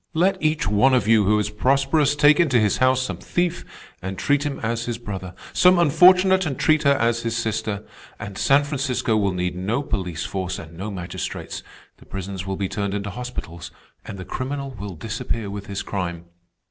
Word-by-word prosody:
Let 190 +4 +2
each 155 -7 +1
one 105 +7 +4
of 105 -5 +1
you 110 -2 +5
who 105 +2 +3
is 105 0 -1
prosperous 135 +6 +2
take 145 +1 +5
into 140 -8 +4
his 105 -2 +2
house 130 0 +3
some - - -4
thief 175 -1 -1 0.4
and 95 +1 -5
treat 145 0 +2
him 140 - -4
as 115 +1 -2
his 120 -1 -3
brother, 95 -6 -7 0.2
some 180 0 +5
unfortunate 185 +4 +5
and 135 - -3
treat 155 -1 +3
her 140 -1 +4
as 120 -1 +1
his 115 0 -2
sister, 110 -2 -2 0.3
and 105 -1 -7
San 140 +7 +4
Francisco 135 -5 -1
will 100 -2 +2
need 90 0 -2
no 105 +10 -1
police 90 - -3
force 95 -1 -3
and 80 0 -10
no 95 +5 -5
magistrates; 90 -3 -5 0.4
the - - -19
prisons 95 0 -6
will 95 -1 -2
be 100 - -1
turned 100 0 -3
into 100 0 -3
hospitals, 100 -7 -7 0.3
and 100 - -8
the 95 - -7
criminal 140 +1 -4
will 100 -5 -7
disappear 110 +2 -4
with 100 0 -7
his 100 0 -4
crime. 85 -4 -4
110 Hz, 195 wpm, -23 LUFS, 95-140 Hz, 0.4 s, you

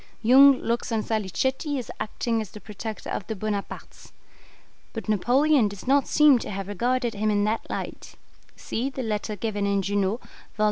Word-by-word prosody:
Jung 270 +4 +7
looks 235 +1 -2
on 220 -1 0
Salicetti 265 - -1
as 250 - -5
acting 225 +1 -2
as 215 - -7
the 210 - -11
protector 215 +1 -7
of 190 - -4
the 220 - -3
Bonapartes; 205 0 -5 0.8
but 225 - -6
Napoleon 245 +5 +3
does 200 -1 -9
not 275 +1 +3
seem 300 -4 +5
to - - -6
have 195 -1 -5
regarded 240 +4 0
him 215 +1 -1
in 205 -1 +2
that 215 +2 -1
light; - - -6 0.4
see 250 +4 -3
the 265 -1 -5
letter 215 -1 -2
given 205 -1 -2
in 200 -1 +1
Junot, 200 +3 0 0.4
vol. - - -27
220 Hz, 175 wpm, -25 LUFS, 205-255 Hz, 0.8 s, Jung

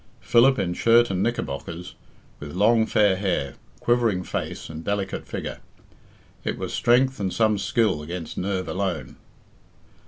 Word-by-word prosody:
Philip 130 +3 +4
in 90 -3 -1
shirt 115 +3 +4
and 95 -1 -1
knickerbockers, 90 -6 -3 0.5
with 75 +2 -8
long 110 +3 +4
fair 105 -3 +3
hair, 90 -8 -1 0.3
quivering 115 -6 +1
face, - - -4
and 80 0 -8
delicate 100 0 -3
figure. - - -5 0.8
It - - -2
was - - -5
strength 130 +1 +3
and 95 -2 -1
some 110 -1 +2
skill 110 -6 +1
against 85 +1 -6
nerve 95 -1 -2
alone. 90 0 -3
100 Hz, 135 wpm, -24 LUFS, 90-115 Hz, 0.8 s, Philip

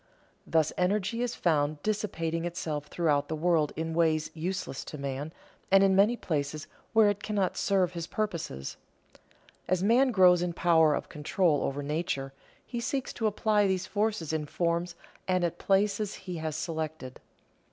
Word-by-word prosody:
_ - - -37 0.4
Thus 160 -2 +2
energy 205 +5 0
is 245 -1 -1
found 150 -3 0
dissipating 165 -6 -1
itself 155 -4 -3
throughout 150 -4 +1
the 160 - -3
world 160 -2 +2
in 160 0 -3
ways 160 -2 +1
useless 165 -4 -4
to 150 - -7
man, 140 +2 -4 0.4
and 195 0 +6
in 200 +5 +4
places 150 -4 -3 0.3
where 220 -2 +5
it 205 0 -6
cannot 205 -3 -1
serve 190 -3 +1
his 170 -2 -5
purposes. 170 - -4 0.9
As 185 0 +1
man 245 +6 +4
grows 180 -5 +5
in 175 -1 -1
power 160 -3 +4
of - - -4
control 150 0 +1
over 140 +1 -2
nature, 140 -3 -2 0.3
he 240 - -4
seeks 260 +3 -2
to 225 - 0
apply 210 0 +2
these 190 -1 0
forces 205 -5 -1
in 155 -1 -2
forms 170 +2 -1 0.3
and 185 -1 +1
at 175 0 -1
places 200 +1 +1
he 180 -2 -7
has 160 -1 -3
selected. 160 -6 -4
175 Hz, 160 wpm, -29 LUFS, 155-195 Hz, 0.9 s, and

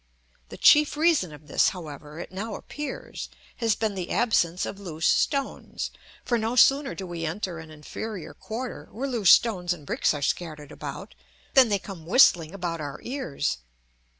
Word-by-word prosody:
The - - -9
chief 300 0 +6
reason 310 - +3
of 150 0 -13
this, 145 - +3
however, 150 -3 -9
it - - -7
now 205 +3 -4
appears, 295 -2 -6 0.3
has 225 -3 +2
been 220 -2 -1
the 185 -3 -5
absence 180 -7 +2
of 200 - -6
loose 165 -5 -4
stones, 275 -1 0 0.3
for 240 -2 +1
no 225 +2 -1
sooner 270 +3 +5
do 195 - -6
we 170 -2 -5
enter 170 +1 -3
an 160 0 -10
inferior 155 +3 -7
quarter 245 +3 -6
where 260 +6 -3
loose 230 -9 +2
stones 180 -6 +5
and 155 -5 -11
bricks - - +1
are 145 - -4
scattered 150 -1 -3
about, - - -7 0.4
than 260 -4 +7
they 205 - +3
come 185 -5 -10
whistling 175 - +5
about 175 -4 -4
our 145 -1 -6
ears. 170 - -2
185 Hz, 170 wpm, -26 LUFS, 160-235 Hz, 0.4 s, than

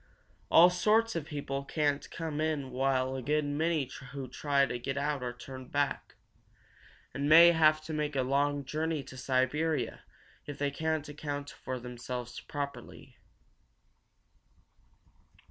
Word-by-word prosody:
All 175 +2 +8
sorts 215 +5 +2
of 165 -3 -2
people 140 -2 -4
can't 145 0 -1
come 160 -2 -4
in 150 -4 -1
while 130 0 0
a 130 - -3
good 150 +3 +1
many 150 0 0 0.3
who 135 -2 -5
try 140 +2 +1
to 125 -2 -4
get 135 +3 -3
out 145 -1 -1
are 125 -1 -3
turned 130 +1 -10
back, 145 -1 -1 1.0
and 140 +1 -1
may 170 +2 +9
have 155 -2 +4
to 155 - -6
make 150 -1 -2
a 130 - +2
long 140 +2 +1
journey 155 +1 -2
to 130 - -11
Siberia 130 +1 0 0.5
if 145 -1 -6
they 145 0 0
cannot 160 +1 -2
account 145 -1 -5
for 130 -1 -6
themselves 120 0 -6
properly. 140 -1 -7
145 Hz, 140 wpm, -31 LUFS, 130-155 Hz, 1.0 s, may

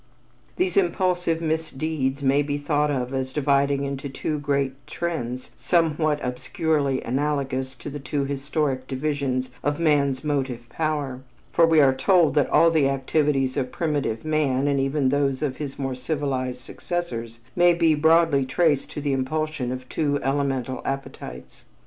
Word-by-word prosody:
These 365 +1 0
impulsive 180 -2 +1
misdeeds 155 -3 -2
may 135 +2 +4
be 145 0 -2
thought 145 0 +1
of 130 -2 -2
as 130 0 -2
dividing 140 0 +2
into 140 0 -4
two 150 +3 -3
great 140 -2 0
trends 130 -8 -4
somewhat 155 -3 +1
obscurely 140 +2 -1
analogous 135 0 -1
to - - -10
the 145 0 -5
two 140 0 -2
historic 140 -1 -2
divisions 135 -2 -2
of 145 +1 0
man's 140 -4 +2
motive 130 -5 -2
power, 145 -3 -2 0.3
for 165 - +5
we 160 -1 +5
are 135 -2 +5
told 165 +1 +3
that 145 -2 +2
all 165 - +5
the 150 -4 +3
activities 135 -1 +1
of 130 -3 -2
primitive 145 -7 -2
man 145 -3 +1
and 140 -1 +2
even 135 0 +1
those 140 0 +1
of 135 -3 -2
his 140 -3 -5
more 135 -1 -2
civilized 130 -2 -2
successors 120 -7 -5 0.2
may 175 -1 +5
be 165 -2 +4
broadly 160 -2 +4
traced 145 +2 +1
to 150 - -4
the 140 -1 0
impulsion 135 0 -1
of 130 0 -6
two 145 -1 0
elemental 135 -2 -1
appetites. 135 - -6
140 Hz, 150 wpm, -24 LUFS, 130-155 Hz, 0.3 s, for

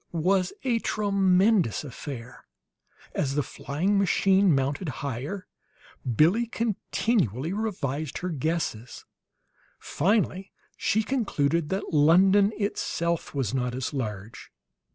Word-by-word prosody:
It 170 - -5
was 185 +2 +2
a 240 -3 +1
tremendous 195 - +2
affair. 130 -3 -8 0.7
As 135 -2 -1
the 145 - +1
flying 180 +12 -1
machine 195 -1 +3
mounted 140 +5 -1 0.2
higher, 140 - -4 0.7
Billie 195 - +4
continually 200 - -1
revised 160 -9 -3
her 180 - -3
guesses; 155 -7 -3 0.7
finally 195 +2 0 0.2
she 220 +1 +1
concluded 170 - 0
that 190 -2 -3
London 190 +7 +5
itself 170 -6 -2
was 130 -5 -1
not 125 -2 -1
as 130 +1 -3
large. 110 -4 -5
170 Hz, 105 wpm, -26 LUFS, 140-200 Hz, 0.7 s, London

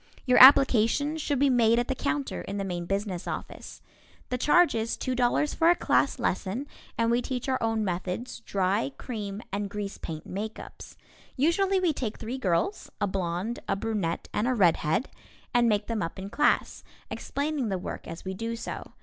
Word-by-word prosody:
Your 250 -2 +5
application 270 +2 +7
should 290 -2 -1
be 275 +1 +3
made 230 -2 +4
at 240 - +1
the 265 - 0
counter 280 +1 -2
in 200 - -5
the 200 - -2
main 175 -2 -4
business 195 -2 -2
office. - - -7 0.5
The 250 - -1
charge 350 +6 +4
is 225 0 -2
$2.00 255 +3 0
for 330 - +4
a 350 - +6
class - - +1
lesson, 215 +9 -2 0.3
and 230 0 +2
we 240 +1 +2
teach 250 0 -4
our 260 -1 0
own 225 -1 0
methods, 185 +6 -4
dry, 200 +7 -1
cream, 210 -4 -5
and 200 0 -2
grease 200 -1 -5
paint 155 -1 -7
makeups. 210 +4 -7 0.4
Usually 375 +7 +2
we 355 -4 +2
take 235 -6 -4
three 240 +4 -5
girls, 205 - -1
a - - +1
blonde, 190 +3 -2
a - - +2
brunette 195 -5 -2
and 215 - 0
a 255 - +1
red 180 -7 +4
head, 160 - 0 0.5
and 240 -1 +4
make 205 -1 +1
them 230 -2 -2
up 165 - -4
in 195 +1 -7
class, 295 - +1 0.3
explaining 285 -4 -2
the 190 - -1
work 180 - -7
as 165 +3 -8
we 190 - -3
do 225 +4 -4
so. 230 - -7
225 Hz, 185 wpm, -27 LUFS, 195-260 Hz, 0.5 s, application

